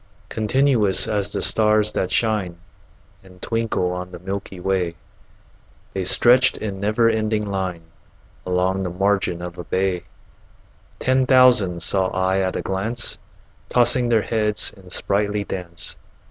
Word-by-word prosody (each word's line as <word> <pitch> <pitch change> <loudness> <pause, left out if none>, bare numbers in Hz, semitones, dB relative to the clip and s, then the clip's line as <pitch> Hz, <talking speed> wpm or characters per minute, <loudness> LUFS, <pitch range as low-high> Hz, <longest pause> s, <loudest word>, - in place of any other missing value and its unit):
Continuous 110 -3 +2
as 105 -2 -1
the - - -2
stars 105 -1 +3
that 95 - -2
shine 105 -7 -1 0.7
And 90 -1 -17
twinkle 115 -5 -1
on 90 0 -6
the - - -9
milky 95 +1 -6
way, 90 -2 -1 1.0
The 95 - -2
stretched 125 +7 +5
in 100 -3 -5
never 110 +3 +2
ending 110 -1 0
line 95 -4 -4 0.6
Along 90 +1 0
the 95 - -2
margin 95 -1 0
of 90 0 -8
a - - -5
bay: 95 -1 -1 0.9
Ten 130 0 +1
thousand 125 - +4
saw 95 +1 +1
I 95 +1 0
at 95 -1 -1
a - - -3
glance, 110 +5 -3 0.5
Tossing 125 0 +4
their 115 -3 +3
heads 105 -2 0
in 95 -3 -16
sprightly 105 +2 0
dance. 90 -3 -4
100 Hz, 135 wpm, -21 LUFS, 90-110 Hz, 1.0 s, stretched